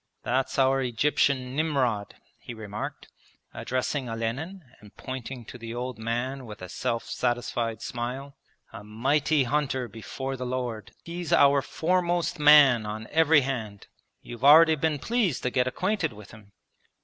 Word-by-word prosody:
'That's 130 +2 -1
our 135 0 +3
Egyptian 130 +1 +1
Nimrod,' 130 -9 0 0.2
he 120 - -9
remarked, 105 -1 -6 0.5
addressing 130 +1 -2
Olenin 130 +12 -4 0.2
and 105 -1 -17
pointing 130 -1 -7
to 125 - -10
the 115 0 -7
old 125 0 -5
man 120 +3 -3
with 105 -3 -10
a 90 - -7
self 115 +5 -2
satisfied 120 -2 -2
smile. 130 +3 -5 0.4
'A - - -9
mighty 135 +7 +1
hunter 130 -1 -1
before 125 +5 -6
the 130 - -6
Lord! 125 -4 -4
He's 170 0 -6
our 140 0 +5
foremost 175 +2 0
man 145 -6 +7
on 110 +1 -5
every 160 -1 +5
hand. 115 -7 -4 0.4
You've 120 +1 -9
already 160 +3 +8
been 155 0 0
pleased 210 - 0
to 125 - 0
get 125 0 +1
acquainted 180 - -1
with 105 -1 -13
him.' 105 -2 -16
130 Hz, 145 wpm, -26 LUFS, 115-150 Hz, 0.5 s, already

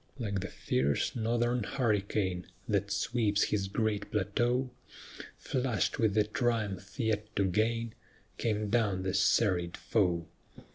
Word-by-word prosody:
Like 100 -6 -2
the 100 - -4
fierce 70 -4 0
northern 120 +1 +1
hurricane 100 -6 0 0.2
That 100 -1 0
sweeps 105 0 +1
his 100 -2 0
great 105 0 -1
plateau, 120 +5 0 0.7
Flushed 130 -5 -1
with 110 -3 +2
the 105 - +5
triumph 105 -2 -2
yet 110 -3 0
to 100 - +2
gain, 115 +4 0 0.5
Came 105 -2 0
down 105 -6 +1
the 95 -1 -1
serried 90 -6 +2
foe. 90 -6 +1
105 Hz, 125 wpm, -31 LUFS, 100-115 Hz, 0.7 s, the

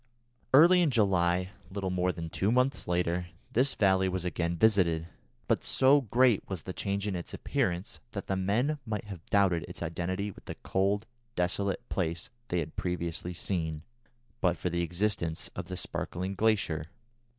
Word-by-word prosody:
Early 170 +6 +7
in 170 - +4
July, 90 -6 +2 0.2
little 95 -1 -3
more 90 0 +1
than 80 -2 -6
two 100 +3 +1
months 125 +3 +1
later, 90 0 0 0.2
this 130 +2 +2
valley 95 -2 +3
was 90 -1 -3
again 85 -1 -1
visited, 85 -6 +3 0.4
but - - +1
so 135 +2 +4
great 120 -2 +3
was 95 -5 -4
the 95 - -5
change 100 +1 -2
in 100 - -1
its 85 - -5
appearance 90 +2 -1
that 100 - -4
the 95 - -1
men 115 +11 +1
might 110 -4 -3
have 95 -5 -8
doubted 95 -5 +3
its - - -7
identity 90 +5 -2
with - - -16
the - - -6
cold, 100 +3 +1 0.3
desolate 95 +2 -1
place 85 -2 -2 0.2
they 90 - -1
had 80 0 -7
previously 90 0 -3
seen, 80 -4 -2 0.6
but 90 -2 +2
for 90 - -2
the 85 0 0
existence 85 -1 -1
of 90 - -4
the 90 0 -5
sparkling 95 +2 -3
glacier. 100 -7 +1
95 Hz, 165 wpm, -30 LUFS, 85-105 Hz, 0.6 s, Early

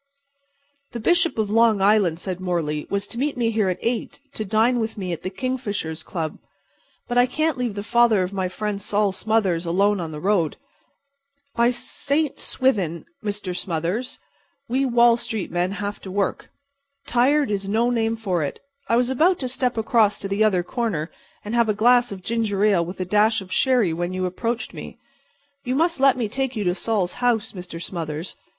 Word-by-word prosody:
"The 235 - -4
Bishop 345 - +2
of 215 -2 0
Long 225 -1 +4
Island," 195 -4 +3
said 185 -1 -4
Morley, 165 -5 -2
"was 200 0 -1
to 235 - -6
meet 280 0 -1
me 230 -2 +1
here 215 -3 +1
at 180 - -1
8 235 0 -2
to 215 - -3
dine 225 +4 +2
with 225 -1 -3
me 185 -3 -3
at 160 - -6
the 185 - -3
Kingfishers' 205 -8 -3
Club. 160 -4 -4 0.7
But 245 -1 +2
I 245 - +5
can't 310 +4 0
leave 245 -5 -2
the 200 - -4
father 230 -3 +4
of 180 +2 -4
my 190 -2 -1
friend 205 +1 -3
Sol 205 -1 +1
Smothers 190 -4 0
alone 195 +4 +2
on 165 -2 -4
the 150 - -6
street. 180 -3 +1 1.0
By 235 0 +4
St. 285 +4 -1
Swithin, 195 - 0 0.2
Mr. 205 -3 -3
Smothers, 175 +9 -2 0.5
we 265 +3 +1
Wall 235 -1 +5
street 225 -5 -4
men 180 +2 0
have 205 0 -4
to 190 - -8
work! 195 0 -2 0.6
Tired 275 +1 +2
is 195 -1 -2
no 230 +4 +2
name 225 -1 +1
for 190 -7 -1
it! 140 - -4 0.3
I 230 - +4
was 245 +2 +2
about 335 +8 +3
to 255 - -1
step 250 -1 -1
across 220 -2 +3
to 200 - -5
the 200 +2 +1
other 190 -5 +2
corner 180 -7 -2 0.3
and 210 - -4
have 235 -2 +3
a 210 - +1
glass 245 +2 +4
of 190 -2 -7
ginger 220 -3 0
ale 195 -5 +3
with 180 +3 -7
a 185 - -1
dash 210 +3 +3
of 190 -1 -11
sherry 245 -10 +3
when 175 +2 -2
you 185 0 -1
approached 230 +6 -3
me. - - -9 0.7
You 255 -1 -1
must 330 +1 +1
let 270 -1 +5
me 235 -3 -1
take 265 +3 -2
you 215 - -1
to 180 -2 +1
Sol's 195 -2 -1
house, 225 -3 +1
Mr. 180 -3 -8
Smothers. 165 -2 -5
210 Hz, 195 wpm, -23 LUFS, 185-240 Hz, 1.0 s, I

